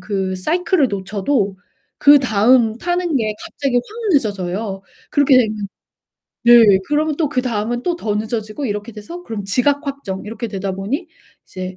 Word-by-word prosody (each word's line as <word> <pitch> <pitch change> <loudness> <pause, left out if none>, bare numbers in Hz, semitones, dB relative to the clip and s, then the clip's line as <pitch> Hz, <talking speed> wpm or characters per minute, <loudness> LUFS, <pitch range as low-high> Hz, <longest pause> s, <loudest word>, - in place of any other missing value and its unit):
그 190 -2 -2
사이클을 330 - +1
놓쳐도 200 +1 -1 0.4
그다음 245 -4 +5
타는 350 0 -1
게 215 -4 -1
갑자기 280 -5 -3
확 245 - +2 0.3
늦어져요. 200 -4 -1 0.3
그렇게 285 -2 +4
되면 215 -4 -1 0.8
네. 230 -5 +7
그러면 300 0 0
또 315 -2 0
그 255 -3 -1
다음은 240 0 -2
또 350 +3 -1
더 220 -11 -2
늦어지고 220 +3 -4
이렇게 210 +1 -4
돼서 280 +12 -9
그럼 215 - -5
지각 280 +9 +1
확정 270 -9 -5
이렇게 230 +2 -5
되다 195 -1 -3
보니 235 - -4 0.4
이제 185 0 -7
225 Hz, 315 characters per minute, -19 LUFS, 205-280 Hz, 0.8 s, 네